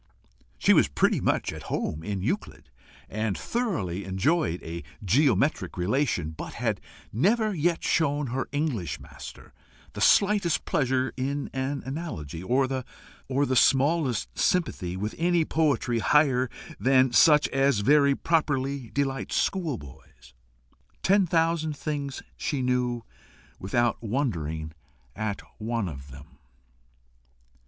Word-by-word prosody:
She - - +4
was - - +5
pretty - - +1
much - - 0
at - - -8
home 75 - -2
in 95 +2 -3
Euclid, 85 - -4 0.4
and 110 -2 -2
thoroughly 130 - -2
enjoyed 95 - 0
a 85 +1 -6 0.2
geometric 140 - +2
relation, 90 - 0
but 80 - -8
had - - -2 0.3
never 210 - +2
yet 170 0 0
shown 145 -2 +1
her 130 0 -2
English 135 - -2
master - - -11 0.4
the - - -6
slightest 200 -4 +3
pleasure 130 -2 0
in 140 +2 -3
an 135 +1 -2
analogy, 130 - -5
or 130 +8 +2
the 130 +1 -3
smallest 135 -1 +2
sympathy 95 - 0
with 105 +3 -3
any 170 -1 +2
poetry 140 -8 +1
higher 130 -1 +3 0.3
than 130 -1 +4
such 150 +2 +6
as 135 -5 +2
very 140 +4 +4
properly 140 -6 0
delights 135 -1 -2
schoolboys. 115 - -4 0.7
Ten 195 0 +4
thousand 165 -2 +1
things 140 -3 -4
she 140 -3 -2
knew 125 -2 0 0.6
without 120 +5 0
wondering 85 - -2 0.4
at 110 -2 -3 0.2
one 115 -2 -2
of 70 -4 -8
them. 70 +1 -14
130 Hz, 115 wpm, -27 LUFS, 105-150 Hz, 0.7 s, such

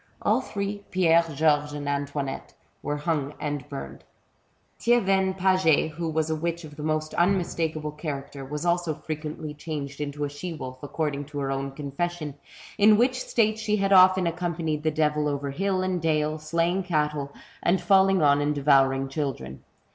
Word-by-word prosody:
All - - +3
three, 200 0 -4
Pierre, 170 -3 +4
Georges, 150 -1 +2
and 145 -1 -5
Antoinnette, 140 -1 -3 0.3
were 145 +1 -2
hung 150 -2 -2
and 145 -3 -4
burned. 70 0 -7 0.8
Thievenne 195 -5 +2
Paget, 185 -5 +3
who 165 +1 -3
was 160 0 0
a - - +1
witch 170 +2 -3
of 150 -2 -10
the 150 - -8
most 155 0 -1
unmistakable 170 -4 0
character, 145 -2 -6
was 150 +4 -5
also 170 -2 +1
frequently 155 0 -5
changed 145 -2 -6
into 145 0 -3
a - - 0
she 165 +4 -5
wolf, 130 -4 -8
according 145 -1 -3
to 145 +1 -9
her 135 -1 -1
own 135 0 -2
confession, 150 +2 -3 0.5
in 210 +1 +7
which 255 +2 +2
state 220 -1 +1
she 215 -1 0
had 195 0 +2
often 185 0 +7
accompanied 170 -3 -2
the 155 - +1
devil 150 -1 +1
over 140 -1 -2
hill 185 +4 0
and 185 -2 -1
dale, 155 -1 0
slaying 170 +4 0
cattle, 150 -5 -1 0.3
and 180 +2 +2
falling 195 -3 +4
on 145 0 +4
and 150 +1 0
devouring 135 -1 +3
children. 135 - -4
155 Hz, 165 wpm, -26 LUFS, 145-175 Hz, 0.8 s, in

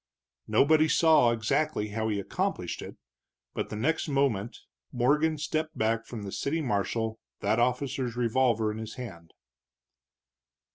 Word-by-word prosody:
Nobody 155 +2 +4
saw 155 -6 +5
exactly 115 +1 0
how 110 +1 -2
he 105 -2 -1
accomplished 100 - -2
it, - - -9 0.6
but - - -3
the - - -5
next 135 +12 0
moment 130 -6 0 0.3
Morgan 150 +6 +2
stepped 155 +1 -2
back 115 +1 0
from 115 -4 -6
the 100 - -6
city 150 +10 -1
marshal, 110 -3 -1 0.2
that 105 +3 +1
officer's 125 0 0
revolver 120 -2 +2
in 110 - -6
his 110 0 -7
hand. 85 -10 -9
120 Hz, 135 wpm, -28 LUFS, 110-140 Hz, 0.6 s, saw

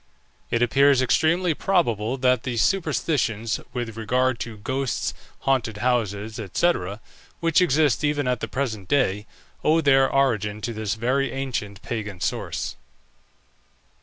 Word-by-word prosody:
It 120 +1 +1
appears 135 +2 +4
extremely 160 +7 +2
probable 130 - 0
that 125 -2 +2
the 120 -2 -3
superstitions 125 - 0
with 120 -3 -4
regard 125 +2 0
to 115 -2 -5
ghosts, 130 +5 -2 0.3
haunted 120 -6 0
houses, 110 -3 -1
&c., 175 - +4 0.7
which 165 +1 +3
exist 150 -5 +2
even 145 -2 +1
at 125 -2 0
the - - -3
present 110 -8 -3
day, 105 -6 +1 0.4
owe 160 +2 +4
their 135 -3 +4
origin 105 -7 +1
to 115 +2 -3
this 110 -1 -2
very 130 +3 0
ancient 120 -7 -4
pagan 105 -6 -5
source. 80 - -3
125 Hz, 130 wpm, -24 LUFS, 110-140 Hz, 0.7 s, appears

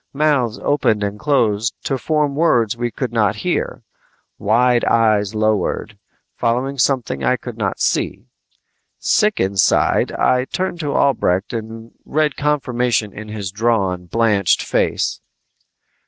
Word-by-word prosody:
Mouths 140 -6 +1
opened 110 -7 +1
and 100 +1 -3
closed 115 -5 +1
to 135 - -1
form 150 -1 0
words 120 -8 +2
we 120 0 -2
could 120 +1 -5
not 105 -4 +2
hear. - - -2 0.6
Wide 120 +3 +2
eyes 110 -2 +2
lowered, 110 -3 0 0.4
following 130 +4 -1
something 125 - 0
I 65 - +2
could - - -8
not - - -2
see. - - -1 0.7
Sick 210 0 +1
inside, 95 0 +2
I 125 0 +2
turned 180 +3 -3
to 145 -3 -2
Albrecht 105 -8 +1
and 115 0 -7
read 155 -1 0
confirmation 125 -7 0
in 110 +1 -8
his 105 -3 -5
drawn, 100 -5 0
blanched 105 -2 +2
face. - - -1
115 Hz, 125 wpm, -19 LUFS, 105-135 Hz, 0.7 s, words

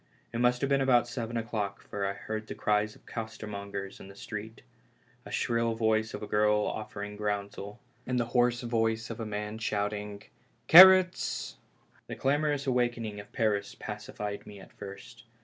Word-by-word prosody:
It 115 - -2
must 125 0 +3
have 140 - 0
been 140 0 +3
about 125 -3 +4
seven 120 -1 -4
o'clock, 110 -4 -3
for 100 -1 -2
I 100 - -2
heard 110 +2 -5
the - - -6
cries 105 0 +1
of - - -21
costermongers 100 -3 -6
in - - -11
the 100 - -13
street, 110 +2 -7 0.6
the - - -11
shrill 115 -1 0
voice 110 -1 +1
of - - -7
a - - -5
girl 105 0 +3
offering 105 -1 -5
groundsel, 105 -1 -4 0.3
and 125 -1 0
the 120 - +1
hoarse 120 -1 +3
voice 115 -1 0
of 115 - -7
a 110 - -4
man 105 +1 -4
shout 105 -1 -1
ing 105 -1 -6 0.2
" - - -39
carrots! 185 +1 +7 0.3
" - - -33
The - - -5
clamorous 145 +1 +1
awakening 120 -5 0
of 100 - -11
Paris 105 -3 0
pacified 105 -1 -6
me 100 -1 -10
at 95 - -15
first. 105 +4 -10
110 Hz, 180 wpm, -29 LUFS, 105-120 Hz, 0.6 s, carrots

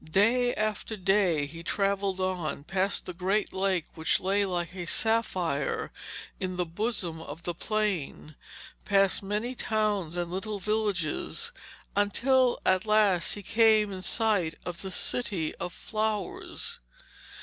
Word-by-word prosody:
Day 230 +9 +3
after 215 +1 -1
day 185 -6 +2
he 165 +3 -8
travelled 195 +1 0
on, 180 -6 -2
past 190 +4 0
the 180 - -5
great 190 +4 0
lake 190 -3 +1
which 160 -1 +1
lay 200 +2 +1
like 175 -2 -2
a 175 -2 -5
sapphire 185 -11 +1 0.5
in 185 -1 -3
the 180 - +1
bosom 175 -2 -2
of 165 +1 -9
the 175 - -2
plain, 185 -6 -2 0.5
past 195 -1 +3
many 210 +5 -2
towns 210 -8 -1
and 175 -1 -2
little 205 +3 -3
villages, 210 - -1 0.4
until 245 +5 +3
at 185 +2 +3
last 210 -5 +4
he 205 - -6
came 220 -1 +4
in 185 - -6
sight 200 -6 +1
of 175 -1 -5
the 190 - -3
City 190 -4 -1
of 175 - -4
Flowers. 215 -3 -3
195 Hz, 135 wpm, -28 LUFS, 175-215 Hz, 0.5 s, last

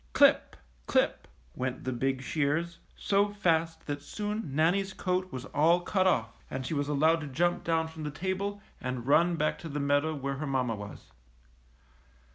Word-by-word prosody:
Clip! - - +4 0.3
clip! - - +1 0.3
went 130 0 -3
the 130 - -2
big 130 +2 -1
shears, 160 +4 -1 0.2
so 200 +1 +2
fast 165 -5 0
that 145 -1 -3
soon 210 -3 -4
Nannie's 190 +5 +2
coat 185 0 -1
was 130 +1 -6
all 165 +4 +3
cut 190 +1 +1
off 115 -11 0
and 130 0 -4
she 145 - -3
was 145 -1 0
allowed 160 +3 +3
to 150 - -5
jump 175 +6 0
down 165 -1 +1
from 160 0 -10
the 150 - -3
table 190 +6 -3 0.2
and 125 -2 -3
run 170 +5 +4
back 155 -1 0
to 165 - -7
the 145 0 -3
meadow 145 +2 +1
where 140 -1 -3
her 150 +1 -4
mamma 130 -4 0
was. 100 -2 -9
155 Hz, 175 wpm, -29 LUFS, 140-175 Hz, 0.3 s, Clip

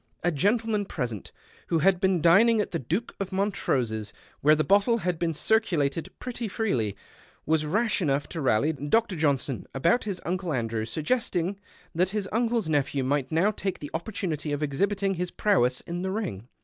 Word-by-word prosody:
A 175 - +2
gentleman 210 - +1
present, 120 - -4 0.4
who 165 - +1
had 185 +3 +3
been 190 -5 +2
dining 220 +7 +6
at 210 - -1
the 165 - -1
Duke 175 - -3
of 195 -1 -3
Montrose's, 125 - -1 0.3
where 150 +2 +5
the 155 - +1
bottle 205 +6 +3
had 180 -5 -2
been 170 -1 +1
circulated 165 -7 +1
pretty 240 -2 -4
freelj', 125 - -1 0.5
was 155 -1 +1
rash 215 +5 +1
enough 140 -3 0
to 165 - -4
rally 135 +4 +2
Dr. 185 - +1
Johnson 140 -4 0
about 170 - +2
his 195 -4 -3
Uncle 180 -1 -2
Andrew, 115 -3 -1
suggesting 185 - -1 0.3
that 180 +2 +2
his 205 -1 -2
uncle's 230 -3 +1
nej)lu 145 -3 +3
\v 140 - -1
might 135 +1 0
now 170 +7 +3
take 195 -2 -3
the 145 - -8
opportunity 165 -4 -3
of 145 +1 -1
exhibiting 195 +7 0
his 180 0 -3
prowess 130 - +2
in 175 +1 -5
the 190 - -2
ring. 190 - -4
175 Hz, 175 wpm, -27 LUFS, 145-205 Hz, 0.5 s, dining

